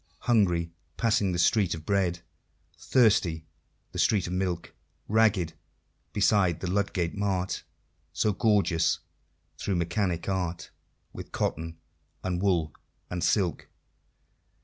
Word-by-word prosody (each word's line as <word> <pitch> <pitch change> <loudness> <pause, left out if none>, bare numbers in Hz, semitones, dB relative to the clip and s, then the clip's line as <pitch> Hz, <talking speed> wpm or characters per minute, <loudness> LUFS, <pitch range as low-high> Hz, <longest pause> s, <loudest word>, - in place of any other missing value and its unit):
Hungry 90 -8 +2 0.3
passing 110 -4 +2
the 90 - -1
Street 95 0 +3
of 80 -1 -10
Bread; 90 -4 +1 0.5
Thirsty 100 -10 +2 0.5
the - - -5
street 100 -5 +3
of 90 - -4
Milk; 90 -2 -2 0.3
Ragged 105 -6 +3 0.6
beside 95 -5 +3
the 90 0 -3
Ludgate 95 -4 0
Mart, 95 -2 -1 0.5
So 105 - +1
gorgeous, 100 -6 +2 0.6
through 100 - -1
Mechanic 85 0 -1
Art, 90 -3 -2 0.4
With - - -9
cotton, 80 +1 -2 0.5
and 90 -1 -1
wool, 85 -6 +1 0.4
and 90 -1 -2
silk! 95 -5 +1
90 Hz, 110 wpm, -28 LUFS, 85-100 Hz, 0.6 s, Street